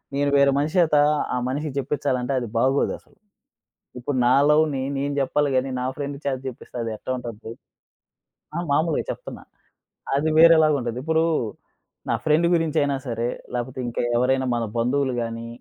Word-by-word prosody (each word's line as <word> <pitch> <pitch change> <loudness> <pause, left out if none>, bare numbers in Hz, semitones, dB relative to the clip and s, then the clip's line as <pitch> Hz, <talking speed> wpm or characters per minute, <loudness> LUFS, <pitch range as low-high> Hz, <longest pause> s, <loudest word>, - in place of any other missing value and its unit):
నేను 140 0 +1
వేరే 140 0 +5
మనిషేత, 155 +1 +2 0.4
ఆ - - 0
మనిషికి 145 +2 -3
జేప్పించాలంటే 135 -2 -1
అది 120 - -5
బాగోదసలు. 135 +4 0 0.8
ఇప్పుడు 130 +3 -3
నా 125 - +5 0.2
లవ్‌ని 150 -3 +2
నేను 140 +1 -1
జేప్పాలి 145 +1 +1
గాని, 130 +1 0
నా 125 - -2
ఫ్రెండ్ 145 -1 -4
చేత 140 -2 0
చెప్పిస్తే 125 0 -10
అదెట్టా 115 +2 -5
ఉంటది? 115 -2 -7 1.0
ఆ! - - -1
మామూలుగా 160 +2 +1
చెప్తున్నా. - - -7 0.7
అది 155 +3 +1
వేరేలాగుంటది. 155 -7 +5
ఇప్పుడు 160 +1 +2 0.9
నా - - +2
ఫ్రెండ్ 155 +2 +3
గురించి 165 -2 +1
అయినా 140 -1 +1
సరే, 115 0 -2 0.3
లేపోతే 125 +1 -4
ఇంకా 120 - -2 0.2
ఎవరైనా 130 +1 +2
మన 120 - -1
బంధువులు 130 +3 +1
గాని, 115 0 -5
140 Hz, 140 wpm, -23 LUFS, 125-150 Hz, 1.0 s, వేరే